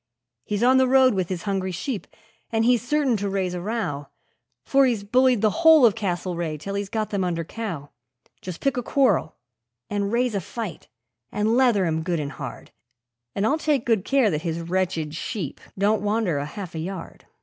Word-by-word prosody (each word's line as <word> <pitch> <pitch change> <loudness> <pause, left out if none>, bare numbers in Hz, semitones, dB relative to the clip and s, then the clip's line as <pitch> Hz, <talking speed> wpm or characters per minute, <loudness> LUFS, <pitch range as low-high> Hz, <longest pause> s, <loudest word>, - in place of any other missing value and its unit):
He's 210 +2 -1
on 260 +2 +5
the 260 0 +4
road 260 -1 +5
with 185 -3 -1
his 180 -2 -4
hungry 195 -2 -1
sheep, 215 - -4 0.4
and 225 0 +1
he's 245 -2 +4
certain 270 0 +1
to 200 0 -2
raise 190 -2 -1
a 180 - -4
row, 175 -9 -3 0.6
For 275 -1 +4
he's 230 -5 -1
bullied 250 +1 +3
the 215 - +4
whole 320 -5 +8
of 220 - +5
the 225 - -9
Castlereagh 175 -4 -2
till 195 +6 -5
he's 200 0 -3
got 215 0 -2
them 200 -2 0
under 170 -2 -1
cow 165 -7 -6 0.5
Just 180 -3 -7
pick 275 -2 0
a - - +1
quarrel 255 - +1 0.6
and 200 -1 -1
raise 240 0 +1
a 200 - -1
fight, 210 -2 -6 0.4
and 215 +2 +1
leather 240 -7 +4
him 160 -1 0
good 170 0 -1
and 145 -1 -3
hard, 135 -6 -8 0.6
And 200 - 0
I'll 295 +7 +2
take 295 -6 +1
good 225 -5 +2
care 265 -2 +3
that 155 -1 -1
his 170 -1 -3
wretched 170 -3 -1
sheep 170 - -5 0.2
don't 205 +2 +2
wander 205 -7 0
a 145 - -3
half 185 +1 -7
a 160 - -4
yard. 180 +2 -7
200 Hz, 200 wpm, -24 LUFS, 175-235 Hz, 0.6 s, whole